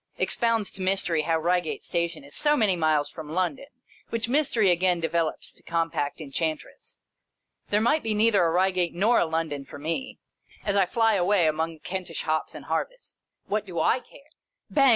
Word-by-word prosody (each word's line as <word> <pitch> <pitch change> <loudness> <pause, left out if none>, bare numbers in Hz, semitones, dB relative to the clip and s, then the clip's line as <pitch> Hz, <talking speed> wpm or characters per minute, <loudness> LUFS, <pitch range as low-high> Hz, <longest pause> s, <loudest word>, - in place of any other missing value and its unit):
Expounds 230 -4 +1
to 190 - -8
Mys 190 +1 +2
tery 160 -3 0
how 165 0 +1
Eeigate 175 0 0
Station 170 -3 -2
is 140 +1 -12
so 295 0 +3
many 210 -6 +3
miles 155 -3 +1
from 160 -2 -9
London, 180 - -1 0.4
which 230 0 -1
Mystery 240 -7 +3
again 175 0 +2
develops 165 -1 -2
to - - -16
Compact 165 -3 -2
Enchantress. 155 +1 -5 0.7
There 210 +1 +2
might 300 +7 +3
be 220 -1 -1
neither 210 -3 +4
a 165 - +3
Eeigate 180 -1 +1
nor 215 +7 +3
a - - +2
London 160 -3 -2
for 135 - -11
me, 165 - -4 0.5
as 200 -1 0
I 195 -2 +3
flyaway 205 -4 +3
among 160 +1 0
the - - -20
Kentish 180 -3 -4
hops 155 0 -1
and - - -9
harvest. - - -4 0.3
What 210 0 -2
do 180 - -9
/ - - 0
care! 260 - -1 0.4
Bang! 275 -2 +5
180 Hz, 180 wpm, -26 LUFS, 160-215 Hz, 0.7 s, Bang